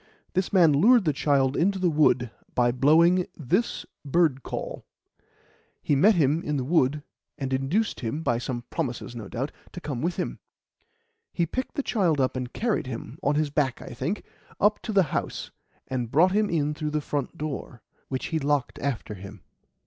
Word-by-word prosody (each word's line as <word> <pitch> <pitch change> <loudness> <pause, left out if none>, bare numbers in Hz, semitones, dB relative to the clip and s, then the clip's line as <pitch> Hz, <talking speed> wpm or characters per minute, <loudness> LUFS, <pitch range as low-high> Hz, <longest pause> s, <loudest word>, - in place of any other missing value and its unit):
This 185 -1 0
man 170 -6 +6
lured 220 - +5
the 155 - +2
child 140 -1 +2
into 195 +3 +2
the 185 -1 +1
wood 130 -6 +3 0.2
by 120 -1 +3
blowing 165 +8 +4
this 180 - 0 0.2
bird 145 -2 +2
call; - - -5 1.0
he 145 - +2
met 200 +10 +5
him 155 0 +2
in 150 -3 -2
the 130 - -1
wood, 145 0 +2 0.3
and 135 -3 -3
induced 145 +12 0
him 130 +7 -3
by 120 -5 +1
some 120 -1 -4
promises, 125 -6 -3
no 110 -4 -6
doubt 135 +5 -3 0.2
to - - -6
come 145 -7 -4
with 170 +3 -1
him. - - -3 0.9
He 170 - 0
picked 255 +11 -4
the 285 - -1
child 180 - +1
up 130 0 +1
and 125 -1 -4
carried 225 - -1
him 125 +3 -7
on 145 -4 +1
his 150 -1 +1
back, 140 -3 0
I - - -9
think 195 +5 -3 0.4
up 210 +1 +3
to 225 - -4
the 195 -2 +5
house, - - -3 0.4
and 125 -3 -2
brought 170 +9 +4
him 210 +1 +2
in 150 -3 0
through 150 0 -3
the 150 0 0
front 145 -2 -3
door, 140 -6 -5 0.2
which 130 -1 -3
he 160 - +2
locked 145 -2 0
after 130 -6 -3
him. 100 0 -10
150 Hz, 185 wpm, -26 LUFS, 130-175 Hz, 1.0 s, man